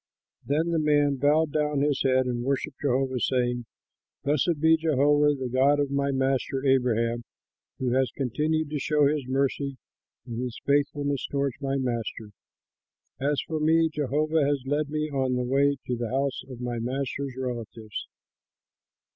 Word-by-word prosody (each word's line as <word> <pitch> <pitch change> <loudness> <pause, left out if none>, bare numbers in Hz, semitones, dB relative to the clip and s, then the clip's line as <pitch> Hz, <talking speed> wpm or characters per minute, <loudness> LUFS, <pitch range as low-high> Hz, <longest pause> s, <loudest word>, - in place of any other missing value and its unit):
Then 160 +4 0
the 165 - +2
man 145 -2 +3
bowed 150 +3 +2 0.3
his 145 -1 +1
head 130 -1 +3
and 120 -1 -2
worshipped 135 +1 -2
Jehovah, 130 -1 0
saying, 120 -1 0 0.6
"Blessed 150 +3 +1
be 160 +1 +5
Jehovah, 150 -1 +3
the 130 - -2
God 135 +4 +3
of 140 -1 0
my 140 0 +1
master 135 0 0
Abraham, 120 -3 +2 0.5
who 125 -2 -1
has 130 0 +2
continued 150 +4 -1
to 150 - -1
show 150 +1 +2
his 145 -2 0
mercy 135 +1 -1 0.5
and 120 0 -5
his 125 -2 -5
faithfulness 145 -1 +1
toward 140 -2 0
my 135 0 -1
master. 115 -4 -3 0.9
As 140 +1 +1
for 160 -1 -4
me, 160 +1 +3
Jehovah 150 +2 +1
has 140 -2 0
led 145 +2 0
me 155 0 -2
on 130 -2 0
the 125 - 0
way 140 +3 +2
to 125 - -1
the 120 -1 -3
house 135 +2 -1
of 125 -2 -8
my 120 -1 -3
master's 135 +2 -3
relatives." 115 -4 -5
140 Hz, 155 wpm, -26 LUFS, 125-145 Hz, 0.9 s, be